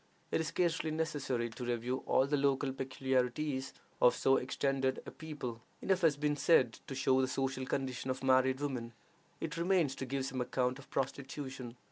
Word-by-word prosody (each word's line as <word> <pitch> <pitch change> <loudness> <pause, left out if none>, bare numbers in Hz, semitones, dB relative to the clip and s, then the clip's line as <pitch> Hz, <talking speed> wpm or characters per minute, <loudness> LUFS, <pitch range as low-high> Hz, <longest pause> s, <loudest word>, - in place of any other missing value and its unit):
It - - +2
is 160 - -2
scarcely 165 -2 +1
necessary 145 -6 -1
to 125 +3 -7
review 120 +2 -1
all 130 - +4
the 145 +1 +1
local 140 -1 +1
peculiarities 130 +1 -1 0.3
of 125 - +6
so 135 0 +4
extended 135 0 0
a - - -7
people: 140 -8 -6 0.2
enough 190 -1 +1
has 155 -4 +4
been 150 0 +1
said 165 +3 +4
to 135 - -5
show 130 0 +3
the 130 - +2
social 130 0 -2
condition 130 -1 -2
of 130 0 -2
married 130 +1 +4
women. 125 -5 -3 0.5
It - - -4
remains 170 -5 +2
to 130 - -4
give 135 +1 -1
some 130 -1 -2
account 125 +1 0
of 135 - -14
prostitution. 135 -2 -4
135 Hz, 175 wpm, -34 LUFS, 130-145 Hz, 0.5 s, of